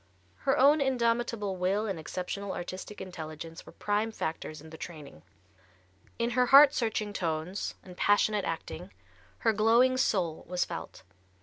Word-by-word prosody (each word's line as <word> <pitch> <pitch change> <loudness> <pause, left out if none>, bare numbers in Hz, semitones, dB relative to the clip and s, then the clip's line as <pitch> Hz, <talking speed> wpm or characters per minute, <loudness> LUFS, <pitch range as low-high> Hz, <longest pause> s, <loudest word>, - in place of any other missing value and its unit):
Her - - +4
own 285 +3 +5
indomitable 235 -6 0
will 190 +4 0
and 195 -6 -3
exceptional 185 +4 -4
artistic 185 +4 -7
intelligence 165 -2 -8
were - - -10
prime 210 +2 -1
factors 160 -5 -4
in 160 +1 -13
the - - -9
training. 150 - -9 1.0
In 235 +1 0
her 250 +1 +2
heart 280 +2 +9
searching 220 -4 -1
tones 170 +1 -3
and 180 -1 -12
passionate 205 +1 +2
acting 165 +3 -5 0.5
her 225 - +5
glowing 235 +5 +4
soul 180 -10 0
was 180 0 0
felt. 170 - -8
200 Hz, 140 wpm, -29 LUFS, 170-230 Hz, 1.0 s, heart